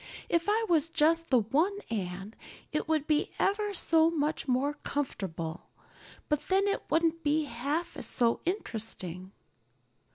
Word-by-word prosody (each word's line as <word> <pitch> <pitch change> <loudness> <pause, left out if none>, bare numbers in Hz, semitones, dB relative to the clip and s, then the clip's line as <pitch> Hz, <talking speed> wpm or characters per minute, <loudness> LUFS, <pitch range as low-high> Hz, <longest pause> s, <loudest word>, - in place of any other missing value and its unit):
If 335 0 +2
I 445 +2 +2
was 330 -2 +3
just 330 +1 +2
the 255 -3 +5
one 315 - +1
Anne 195 0 -4 0.4
it 305 - -1
would 310 -2 +1
be 305 -1 +1
ever 415 +1 +1
so 325 -2 +4
much 305 -2 -1
more 265 +3 +1
comfortable, 185 - -4 0.6
but 300 -1 -1
then 390 +1 +3
it 400 - 0
wouldn't 330 0 +2
be 300 +1 +2
half 290 +7 -3
so 235 -2 +2
interesting." 210 - -3
300 Hz, 135 wpm, -30 LUFS, 235-335 Hz, 0.6 s, the